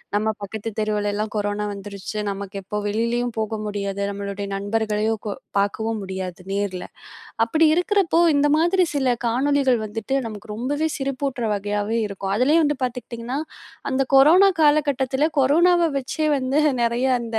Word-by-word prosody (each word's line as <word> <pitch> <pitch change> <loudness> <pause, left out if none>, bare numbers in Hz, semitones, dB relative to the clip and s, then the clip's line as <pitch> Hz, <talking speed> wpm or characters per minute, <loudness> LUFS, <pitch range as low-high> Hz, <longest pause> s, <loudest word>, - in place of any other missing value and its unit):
நம்ம 215 +1 +1
பக்கத்து 220 +2 -5
தெருவுலலாம் 210 0 -1
கொரோனா 205 0 -1
வந்துருச்சு 200 +1 -7
நமக்கு 200 0 -6
எப்போ 210 +2 -4
வெளிலேயும் 235 +3 -1
போக 220 0 -2
முடியாது, 200 -1 -3
நம்மளுடைய 200 0 -5
நண்பர்களையும் 215 +2 -1
கொ - - -1 0.3
பார்க்கவும் 220 +2 -1
முடியாது 190 -2 -5
நேரில, 200 -2 -2 0.6
அப்படி 310 +8 +3
இருக்கிறப்போ 360 -1 +2 0.2
இந்த 285 - +3
மாதிரி 345 +2 +3
சில 265 -3 +1 0.2
காணொளிகள் 260 0 +2
வந்துட்டு 225 +5 -4
நமக்கு 210 -1 -8
ரொம்பவே 290 +8 -1
சிரிப்பூட்டுற 270 -2 -2
வகையாவே 205 +2 -1
இருக்கும், 195 -1 -4
அதுலேயும் 300 +7 +4
வந்து 295 -2 -1
பார்த்துக்கிட்டிங்கன்னா 245 +1 -4 0.5
அந்த 265 0 +1
கொரோனா 350 +8 +7
காலகட்டத்தில 290 -1 +2
கொரோனாவ 335 +5 +4
வச்சே 305 +4 -2
வந்து 260 +2 0 0.2
நிறைய 235 - +3 0.3
அந்த 225 -1 -3
230 Hz, 135 wpm, -22 LUFS, 205-280 Hz, 0.6 s, கொரோனா